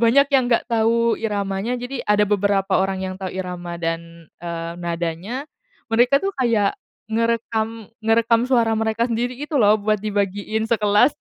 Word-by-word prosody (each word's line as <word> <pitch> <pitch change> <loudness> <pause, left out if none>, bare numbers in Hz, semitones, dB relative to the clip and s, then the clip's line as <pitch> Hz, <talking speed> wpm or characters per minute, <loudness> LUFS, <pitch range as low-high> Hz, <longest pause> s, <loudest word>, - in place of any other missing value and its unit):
banyak 275 +5 +5
yang 260 -3 +4
nggak 235 - +2
tahu 230 0 +2
iramanya. 205 +2 -2
Jadi 245 +1 -5
ada 210 0 +4
beberapa 200 -1 +1
orang 190 0 0
yang 185 0 -4
tahu 190 - -3
irama 180 -2 -5
dan, 165 0 -5
eee, 170 -1 -4
nadanya, 170 - -3 0.5
mereka 245 +4 +4
tuh 390 +7 -1
kayak 225 -5 +2 0.4
ngerekam 225 -1 -1 0.2
ngerekam 230 +1 +3
suara 235 -3 +3
mereka 225 +2 0
sendiri 245 +2 -1
gitu 295 +2 -2
loh 210 0 +5
buat 215 0 0
dibagiin 205 +1 -1
sekelas. 215 +3 +3
220 Hz, 150 wpm, -21 LUFS, 195-235 Hz, 0.5 s, banyak